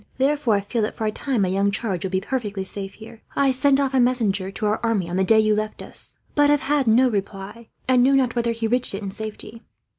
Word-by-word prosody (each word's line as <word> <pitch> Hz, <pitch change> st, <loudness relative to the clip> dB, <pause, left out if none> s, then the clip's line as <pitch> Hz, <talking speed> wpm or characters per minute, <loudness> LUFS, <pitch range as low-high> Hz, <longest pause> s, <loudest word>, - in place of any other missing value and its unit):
Therefore 270 Hz, -4 st, +2 dB
I 200 Hz, -, 0 dB
feel 225 Hz, +4 st, -2 dB
that, 210 Hz, -, -2 dB
for 220 Hz, -, -3 dB
a 215 Hz, -, 0 dB
time, 245 Hz, -1 st, -1 dB
my -, -, +1 dB
young 195 Hz, +2 st, +1 dB
charge 200 Hz, -3 st, -2 dB
will 190 Hz, -, -2 dB
be 185 Hz, 0 st, 0 dB
perfectly 210 Hz, -3 st, -3 dB
safe 195 Hz, 0 st, -5 dB
here. 220 Hz, 0 st, -13 dB
"I 275 Hz, -1 st, +3 dB
sent 270 Hz, +1 st, +2 dB
off 275 Hz, -1 st, 0 dB
a 265 Hz, -, +3 dB
messenger 220 Hz, -6 st, +1 dB
to 205 Hz, +2 st, -5 dB
our 210 Hz, +1 st, +1 dB
army, 225 Hz, -6 st, 0 dB
on 175 Hz, -, -4 dB
the 190 Hz, -, +2 dB
day 220 Hz, +3 st, +4 dB
you 215 Hz, 0 st, +3 dB
left 215 Hz, 0 st, -3 dB
us; -, -, +1 dB, 0.2 s
but 290 Hz, 0 st, +4 dB
have 290 Hz, -1 st, +3 dB
had 285 Hz, -3 st, 0 dB
no 240 Hz, +4 st, +5 dB
reply, 205 Hz, +1 st, -5 dB, 0.2 s
and 255 Hz, -1 st, +4 dB
know 265 Hz, +3 st, +4 dB
not 260 Hz, -3 st, +2 dB
whether 235 Hz, -1 st, 0 dB
he 230 Hz, 0 st, -3 dB
reached 245 Hz, -2 st, +1 dB
it 200 Hz, -, -6 dB
in 195 Hz, -, -4 dB
safety. 220 Hz, +2 st, -6 dB
220 Hz, 260 wpm, -22 LUFS, 200-255 Hz, 0.2 s, no